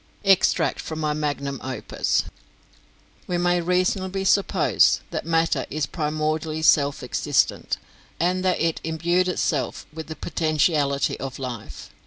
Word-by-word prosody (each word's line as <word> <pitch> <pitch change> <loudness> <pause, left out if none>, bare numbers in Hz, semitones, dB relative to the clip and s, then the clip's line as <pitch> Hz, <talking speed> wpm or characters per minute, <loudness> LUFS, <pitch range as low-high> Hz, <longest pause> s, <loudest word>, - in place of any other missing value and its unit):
"Extract 195 -2 +3
from 160 - -5
my 150 -1 0
Magnum 145 -3 -3
Opus. 130 -3 -1 1.0
"We 180 - -1
may 175 0 +2
reasonably 185 +2 0
suppose 200 +1 +3
that - - -4
matter 165 -4 +1
is 150 0 -1
primordially 155 0 -2
self 145 -3 +3
existent, - - 0 0.4
and 180 +2 +1
that 185 -1 +1
it 165 -1 0
imbued 170 +3 +1
itself 180 - -1
with 160 0 -7
the 160 - -6
potentiality 155 -4 0
of 130 -1 -5
life. 115 - -7
160 Hz, 125 wpm, -24 LUFS, 145-175 Hz, 1.0 s, Extract